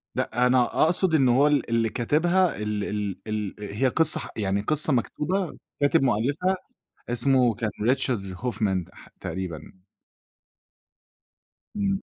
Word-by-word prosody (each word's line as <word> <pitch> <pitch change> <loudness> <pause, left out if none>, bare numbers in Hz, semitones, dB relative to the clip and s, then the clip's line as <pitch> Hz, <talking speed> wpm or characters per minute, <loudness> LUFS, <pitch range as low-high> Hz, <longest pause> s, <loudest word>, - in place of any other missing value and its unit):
لأ، 125 +1 0
أنا 125 0 +4 0.2
أقصد 170 +1 +2
إن 135 -4 +3
هو 135 +4 +4
ال 145 -4 0
اللي 115 -1 +1
كاتبها 170 - +1
ال 105 -1 -3
ال 105 -2 -3
ال 105 -2 -3
هي 105 +5 -1
قصة 160 +6 +5
ح - - -6
يعني 100 -1 -1
قصة 155 +5 +3
مكتوبة 170 - -2 0.2
كاتب 145 - +3
مؤلفها 140 - 0 0.5
اسمه 125 -1 +2
كان 110 -1 -3 0.2
Richard 115 -8 -1
Hoffman 105 -7 -1
ح - - -16
تقريبًا. 90 +1 -7 1.9
إمم. 200 -1 -1
125 Hz, 130 wpm, -25 LUFS, 105-150 Hz, 1.9 s, قصة